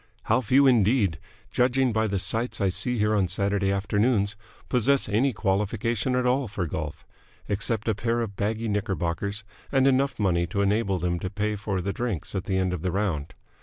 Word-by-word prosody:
How 115 +4 +2
few 130 +4 +4
indeed, 110 - +3 0.3
judging 125 0 +2
by 110 0 +1
the 100 -1 -1
sights 115 +6 0
I 100 -2 +2
see 125 +6 -1
here 105 0 +2
on 100 -3 +2
Saturday 100 +1 +1
afternoons, 100 +1 +1 0.3
possess 130 +3 +2
any 115 +7 +2
qualification 105 +4 0
at 125 0 +1
all 130 +1 +1
for 100 -3 -3
golf 75 -2 -5 0.4
except 110 +2 -1
a 110 - +3
pair 115 +3 -1
of 105 -4 -4
baggy 110 +3 -2
knickerbockers 100 0 -2 0.3
and 135 -1 +3
enough 135 +1 +2
money 85 -4 +1
to 100 +4 -1
enable 100 -1 +1
them 85 0 -1
to 90 - -4
pay 105 +2 -2
for 100 -2 -2
the 100 +2 -2
drinks 115 -10 -3
at 95 -1 -3
the 95 - 0
end 95 -1 0
of 90 - -4
the 90 - -1
round. 90 -7 -2
105 Hz, 190 wpm, -26 LUFS, 95-115 Hz, 0.4 s, few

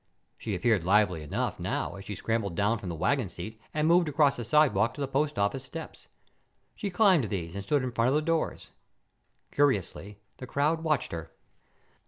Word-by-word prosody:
She - - -4
appeared 115 -8 +2
lively 95 -3 +3
enough 75 - -3
now - - -2
as 100 0 -10
she 105 - -5
scrambled 105 -4 -2
down 105 +4 +1
from 95 - -6
the 85 - -4
wagon 125 - 0
seat 110 +6 -8
and 150 0 0
moved 170 -1 +4
across 145 -1 +3
the 120 - -5
sidewalk 115 -4 +3
to 145 - -7
the 140 - -1
post 145 0 -1
office 100 +6 0
steps. 160 +5 -9 0.7
She 205 - -4
climbed 185 - +4
these 90 -5 -4
and 100 0 -5
stood 140 +6 +1
in 130 - -2
front 115 +1 +2
of 135 - +2
the 150 - +3
doors. 165 0 -2 0.8
Curiously, 105 -7 0 0.2
the 130 - -8
crowd 155 +5 0
watched 155 -10 0
her. 80 -2 -6
120 Hz, 190 wpm, -28 LUFS, 100-150 Hz, 0.8 s, moved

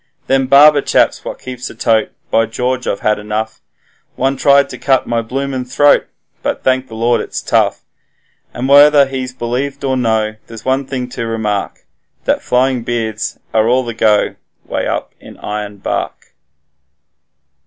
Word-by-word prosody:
'Them 135 -1 +1
barber 145 +2 +7
chaps - - +1
what - - -6
keeps 125 -1 -7
a - - -12
tote, 110 -1 +1 0.2
By 115 0 +3
George, 125 +3 -2
I've 100 - -2
had 105 -1 +1
enough, 105 +1 -4 0.5
One 135 +1 0
tried 140 +1 +4
to - - -9
cut 135 -2 +2
my 115 -1 0
bloomin' 130 +2 -3
throat, 140 +3 +3 0.3
but - - -3
thank 130 0 +1
the 110 - -10
Lord 120 +2 +1
it's - - -5
tough.' - - 0 0.7
And 125 +2 -3
whether 145 +1 +7
he's 130 -1 -4
believed 130 +3 -3
or 135 -1 0
no, 110 -3 0
there's 115 -1 -11
one 130 +1 0
thing 130 -2 -3
to 115 -1 -4
remark, 105 -3 -3 0.4
That - - +1
flowing 125 0 +1
beards 115 -2 -3 0.2
are 110 0 +3
all 130 +1 +2
the 115 - -4
go 110 -2 +2 0.3
way - - -2
up - - -3
in - - -13
Ironbark. 105 -1 -5
125 Hz, 160 wpm, -16 LUFS, 110-135 Hz, 0.7 s, barber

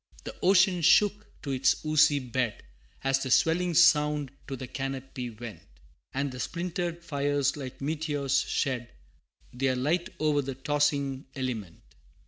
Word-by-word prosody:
The - - -7
ocean 185 -1 +4
shook 205 +5 +4 0.2
to 140 - -3
its 135 +3 +1
oozy 155 -1 +4
bed, 125 -3 -2 0.4
As 135 0 +2
the 130 - -3
swelling 170 +6 +3
sound 150 -4 +4 0.2
to 135 - -4
the 130 - -6
canopy 135 -1 -5
went, 110 -6 -9 0.5
And 140 +1 -2
the 125 - -8
splintered 170 +2 -3
fires 145 -3 0
like 135 -3 -8
meteors 145 -2 0
shed 125 -4 -2 0.6
Their 130 +1 0
light 155 +8 0
o'er 150 -2 +2
the 135 -1 -5
tossing 140 -1 0
element. 115 - -5
140 Hz, 135 wpm, -28 LUFS, 130-155 Hz, 0.6 s, ocean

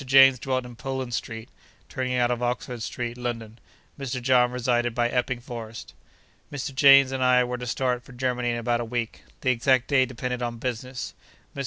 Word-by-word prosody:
James 135 -1 +7
dwelt 130 0 -1
in 120 -1 -10
Poland 130 0 -4
Street, 115 0 -4 0.4
turning 130 -1 -2
out 120 -1 +2
of 120 0 -2
Oxford 125 0 -2
Street, 120 +1 -4
London; 115 -2 -5 0.4
Mr. 130 -2 -3
John 125 -1 +4
resided 120 -1 0
by 120 -1 +2
Epping 125 0 -1
Forest. 115 -2 -8 0.6
Mr. 140 -1 -4
James 135 0 +7
and 130 -1 -1
I 125 0 +5
were 125 0 -3
to 125 - -5
start 125 0 0
for 125 - -15
Germany 125 -1 -1
in 120 - -1
about 120 0 0
a - - -2
week. 115 -1 -4 0.2
The 130 - +3
exact 125 +1 +2
day 130 -2 +4
depended 125 0 -4
on 120 -1 -3
business. 125 +1 -4 0.4
Mr. - - -6
125 Hz, 190 wpm, -25 LUFS, 120-130 Hz, 0.6 s, James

